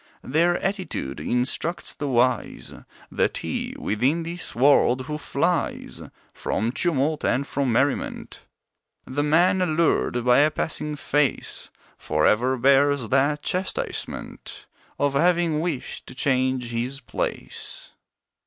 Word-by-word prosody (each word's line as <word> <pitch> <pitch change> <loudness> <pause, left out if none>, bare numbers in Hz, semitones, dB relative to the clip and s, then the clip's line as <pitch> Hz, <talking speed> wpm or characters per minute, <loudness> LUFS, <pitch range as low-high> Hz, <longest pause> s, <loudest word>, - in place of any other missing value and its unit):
Their 170 +6 +2
attitude, 185 - -3
instructs 125 - 0
the 145 - -4
wise, 125 -2 0 0.4
That - - 0
he - - -4
within 135 +11 0
this 170 +1 -5
world 130 -1 +4
who 150 +3 -5
flies - - -1 0.3
From 110 +4 -1
tumult 155 0 0
and 140 +3 +1
from 140 -2 -1
merriment; 135 +4 -1 0.6
The 140 +3 -2
man 175 +5 +3
allured 155 -7 +1
by 125 +1 +5
a 150 +2 +5
passing 150 -1 -1
face, 145 -1 -1 0.3
For 75 0 0
ever 125 +4 +3
bears 135 -1 +3
the 140 +2 +3
chastisement 185 0 -3 0.3
Of 145 -1 +1
having 170 +1 +2
wished 160 -5 -4
to - - -10
change 130 -2 +1
his 125 +4 -3
place. - - -4
140 Hz, 115 wpm, -24 LUFS, 125-160 Hz, 0.6 s, by